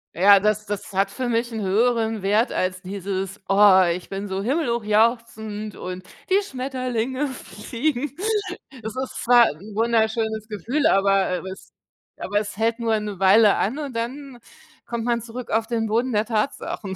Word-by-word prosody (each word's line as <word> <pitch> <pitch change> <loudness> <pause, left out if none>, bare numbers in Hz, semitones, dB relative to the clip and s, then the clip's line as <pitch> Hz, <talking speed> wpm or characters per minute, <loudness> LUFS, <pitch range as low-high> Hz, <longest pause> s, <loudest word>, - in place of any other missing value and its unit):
Ja, 200 +3 +7
das 210 +1 0
das 205 0 -5
hat 195 +1 +1
für 255 -2 -3
mich 235 +1 0
'n 220 -1 -4
höheren 220 +1 +1
Wert 210 +5 +2
als 185 0 -1
dieses: 195 0 -4
„Oh, 195 -1 +6
ich 180 +1 -5
bin 195 +1 -4
so 190 0 -3
himmelhochjauchzend 220 -4 0
und 180 0 -6 0.3
die 395 +2 +5
Schmetterlinge 255 - -3
fliegen." 245 +5 -3 0.7
Es 220 +1 -6
ist 260 0 -4
zwar 240 -1 +7
'n 200 +8 -12
wunderschönes 220 -1 0
Gefühl, 235 - 0
aber, 195 -1 +3 0.2
äh, - - -5
es 190 - -12 0.5
aber 205 +1 -1
es 205 -1 -6
hält 230 +1 0
nur 225 -2 +1
'ne 205 -3 -6
Weile 200 +2 +6
an 235 +9 -1
und 280 -5 -5
dann 255 +2 -5 0.5
kommt 235 -1 -3
man 235 -1 0
zurück 235 +1 -8
auf 225 +1 +1
den 230 -2 -1
Boden 235 +4 0
der 210 0 +1
Tatsachen. 215 -3 -3
220 Hz, 165 wpm, -23 LUFS, 200-240 Hz, 0.7 s, Ja